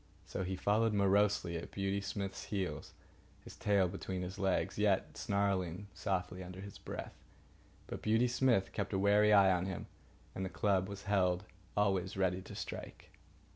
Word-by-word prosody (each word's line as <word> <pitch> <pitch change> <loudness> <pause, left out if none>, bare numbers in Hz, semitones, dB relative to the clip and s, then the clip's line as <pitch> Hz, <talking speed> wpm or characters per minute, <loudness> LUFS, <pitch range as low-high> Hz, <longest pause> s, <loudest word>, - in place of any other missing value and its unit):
So - - -3
he 95 +1 -2
followed 105 +3 +2
morosely 100 -2 +3
at 80 - -6
Beauty 100 0 -1
Smith's 100 0 -4
heels, 95 -3 -3 0.5
his - - -11
tail 100 -3 +3
between 95 0 -4
his 95 +2 -6
legs, 95 -1 0
yet - - +2
snarling 100 -1 -1
softly 90 0 -2
under 90 +1 -9
his 100 0 -9
breath. - - -6 0.7
But - - -6
Beauty 110 +3 +3
Smith 120 -5 +2
kept - - -2
a - - +2
wary 105 +2 +5
eye 100 -2 +7
on 90 0 +1
him, 95 -3 -4 0.5
and 95 - -4
the 95 - -2
club 95 +2 +1
was 100 0 -7
held 95 -3 +2 0.3
always 95 -2 +1
ready 95 -1 +1
to - - -10
strike. - - -7
95 Hz, 165 wpm, -35 LUFS, 95-100 Hz, 0.7 s, eye